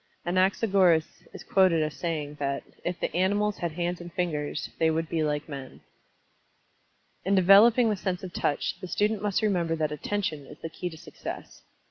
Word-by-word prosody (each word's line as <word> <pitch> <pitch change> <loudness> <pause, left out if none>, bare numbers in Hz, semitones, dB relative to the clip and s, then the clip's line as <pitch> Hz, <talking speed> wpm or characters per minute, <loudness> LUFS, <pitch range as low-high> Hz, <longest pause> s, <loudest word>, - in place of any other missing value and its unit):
Anaxagoras 185 -2 +2
is - - -10
quoted 185 -5 +3
as 155 -1 -2
saying 155 -4 -3
that 140 -1 -2 0.2
"if 175 0 -3
the - - -3
animals 205 +3 +1
had 170 -2 -2
hands 175 +1 -2
and 175 0 -9
fingers, 165 -5 -2
they 160 - +4
would 160 +1 0
be 165 0 -1
like 150 -1 -1
men." 140 -3 -8 1.4
In 195 +2 +2
developing 215 +5 +6
the - - +1
sense 185 -1 -3
of 180 -2 -7
Touch, 145 - -1
the 185 - -5
student 210 +2 0
must 205 0 0
remember 175 -6 +1
that 155 -2 -1
Attention 155 -2 -3
is 150 - -12
the 165 - -6
key 180 +2 -5
to 160 - -11
success. - - -8
175 Hz, 175 wpm, -27 LUFS, 155-195 Hz, 1.4 s, developing